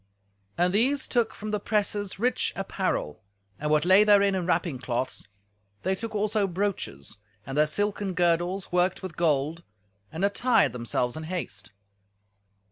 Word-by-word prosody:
And 180 Hz, +1 st, +2 dB
these 260 Hz, +7 st, +3 dB
took 235 Hz, -3 st, +1 dB
from 215 Hz, 0 st, -5 dB
the 210 Hz, -, 0 dB
presses 205 Hz, -1 st, -1 dB
rich 245 Hz, +5 st, 0 dB
apparel, 75 Hz, -, -2 dB, 0.4 s
and 150 Hz, -, -2 dB
what 150 Hz, +1 st, +3 dB
lay 190 Hz, +3 st, +7 dB
therein 200 Hz, -1 st, +5 dB
in 180 Hz, -2 st, -2 dB
wrapping 170 Hz, -6 st, 0 dB
cloths; 125 Hz, -3 st, -3 dB, 0.6 s
they 190 Hz, -, +1 dB
took 220 Hz, +3 st, -5 dB
also 210 Hz, 0 st, +1 dB
brooches, 175 Hz, -, -3 dB, 0.3 s
and 135 Hz, -, -5 dB
their 150 Hz, +1 st, +4 dB
silken 205 Hz, +2 st, -1 dB
girdles 175 Hz, +2 st, +1 dB
worked 180 Hz, +2 st, +1 dB
with 185 Hz, -4 st, -6 dB
gold, 155 Hz, 0 st, +1 dB, 0.5 s
and 175 Hz, +5 st, 0 dB
attired 240 Hz, +5 st, +3 dB
themselves 120 Hz, 0 st, -1 dB
in 155 Hz, 0 st, -6 dB
haste. 115 Hz, -, -4 dB
185 Hz, 145 wpm, -27 LUFS, 155-205 Hz, 0.6 s, lay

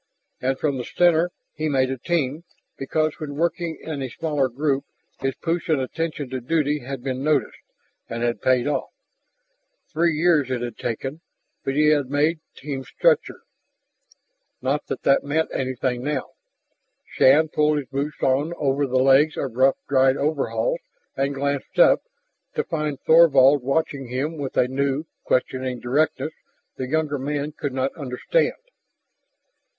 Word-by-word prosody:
And 130 Hz, +1 st, 0 dB
from 140 Hz, -3 st, -1 dB
the -, -, -3 dB
center 175 Hz, +4 st, +3 dB, 0.2 s
he 155 Hz, 0 st, -2 dB
made 130 Hz, -2 st, +2 dB
a 135 Hz, -, -3 dB
Team, 155 Hz, 0 st, -1 dB, 0.3 s
because 155 Hz, +4 st, -1 dB
when 145 Hz, -3 st, -5 dB
working 170 Hz, +1 st, -1 dB
in 155 Hz, -3 st, -5 dB
a 130 Hz, -, -3 dB
smaller 145 Hz, -1 st, -1 dB
group 140 Hz, +2 st, 0 dB, 0.4 s
his 135 Hz, 0 st, -1 dB
push 170 Hz, +1 st, -2 dB
and 155 Hz, -3 st, +3 dB
attention 150 Hz, +2 st, -3 dB
to 130 Hz, -1 st, -3 dB
duty 150 Hz, +2 st, +1 dB
had 135 Hz, -1 st, -7 dB
been 130 Hz, 0 st, -3 dB
noticed 150 Hz, -5 st, +1 dB, 0.5 s
and 115 Hz, +1 st, -3 dB
had 120 Hz, 0 st, -1 dB
paid 130 Hz, -2 st, +3 dB
off. 145 Hz, -2 st, -1 dB, 1.0 s
Three 165 Hz, 0 st, +2 dB
years 155 Hz, -4 st, +3 dB
it 125 Hz, -2 st, -2 dB
had 120 Hz, -2 st, -6 dB
taken, 135 Hz, +6 st, -4 dB, 0.4 s
but 135 Hz, -, -2 dB
he 150 Hz, +1 st, +4 dB
had 145 Hz, -4 st, +2 dB
made 150 Hz, +3 st, +1 dB, 0.2 s
Team 135 Hz, -1 st, -5 dB
stature. 485 Hz, -, +1 dB, 1.2 s
Not 135 Hz, +3 st, -1 dB
that -, -, -4 dB
that 135 Hz, -, +4 dB
meant 155 Hz, +3 st, 0 dB
anything 130 Hz, -1 st, -2 dB
now. 145 Hz, -2 st, -2 dB, 0.8 s
Shann 150 Hz, +4 st, +4 dB
pulled 150 Hz, 0 st, +2 dB
his 140 Hz, -3 st, -4 dB
boots 140 Hz, +2 st, -4 dB
on 145 Hz, +6 st, +1 dB
over 140 Hz, 0 st, +1 dB
the 130 Hz, 0 st, 0 dB
legs 135 Hz, +4 st, +4 dB
of 135 Hz, -4 st, -3 dB
rough 135 Hz, +2 st, +4 dB
dried 135 Hz, -1 st, +4 dB
coveralls 155 Hz, -, 0 dB, 0.4 s
and 140 Hz, +1 st, -1 dB
glanced 140 Hz, 0 st, -2 dB
up, -, -, +6 dB, 0.5 s
to -, -, +1 dB
find 150 Hz, -4 st, -3 dB
Thorvald 145 Hz, -4 st, +6 dB
watching 140 Hz, 0 st, -1 dB
him 140 Hz, +6 st, -3 dB
with 135 Hz, -2 st, -4 dB
a 125 Hz, -, +4 dB
new, 140 Hz, +2 st, -1 dB, 0.2 s
questioning 130 Hz, 0 st, 0 dB
directness 150 Hz, +5 st, 0 dB, 0.4 s
the 130 Hz, -, -4 dB
younger 155 Hz, -1 st, 0 dB
man 145 Hz, +2 st, -2 dB
could 145 Hz, -1 st, -4 dB
not 130 Hz, +1 st, 0 dB
understand. 140 Hz, -, 0 dB
140 Hz, 155 wpm, -23 LUFS, 130-155 Hz, 1.2 s, up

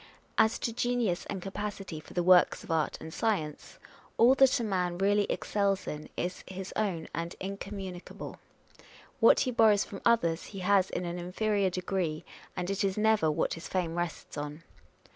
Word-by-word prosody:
As 220 Hz, +1 st, +4 dB
to 230 Hz, -, -3 dB
genius 240 Hz, -6 st, 0 dB
and 190 Hz, -3 st, -4 dB
capacity 195 Hz, -4 st, -5 dB
for 155 Hz, -, -14 dB
the 175 Hz, -, +1 dB
works 180 Hz, 0 st, +5 dB
of -, -, -7 dB
art 160 Hz, -2 st, 0 dB
and 160 Hz, -, -8 dB
science, 175 Hz, -10 st, -2 dB, 0.4 s
all 240 Hz, +3 st, +7 dB
that 270 Hz, -2 st, +5 dB
a -, -, -1 dB
man 180 Hz, -4 st, -1 dB
really 205 Hz, +2 st, +3 dB
excels 200 Hz, -2 st, 0 dB
in 150 Hz, 0 st, -6 dB
is 180 Hz, +1 st, -3 dB
his 190 Hz, 0 st, -7 dB
own 185 Hz, -7 st, -1 dB
and 170 Hz, +2 st, -4 dB
incommunic 195 Hz, -2 st, -6 dB
able; -, -, -8 dB, 0.8 s
what -, -, +6 dB
he 255 Hz, -, +1 dB
borrows 220 Hz, -4 st, +5 dB
from 195 Hz, -, -9 dB
others 170 Hz, -8 st, +2 dB
he -, -, -5 dB
has 190 Hz, 0 st, +3 dB
in 180 Hz, -, -3 dB
an 175 Hz, +1 st, -4 dB
inferior 200 Hz, +2 st, 0 dB
degree, 180 Hz, -3 st, -2 dB, 0.3 s
and 180 Hz, +1 st, -2 dB
it 195 Hz, +2 st, -1 dB
is 195 Hz, 0 st, 0 dB
never 215 Hz, -6 st, +3 dB
what 155 Hz, +1 st, 0 dB
his 165 Hz, -, -7 dB
fame 175 Hz, -3 st, -1 dB
rests 175 Hz, -3 st, -4 dB
on. 150 Hz, +2 st, -6 dB
190 Hz, 180 wpm, -30 LUFS, 175-210 Hz, 0.8 s, all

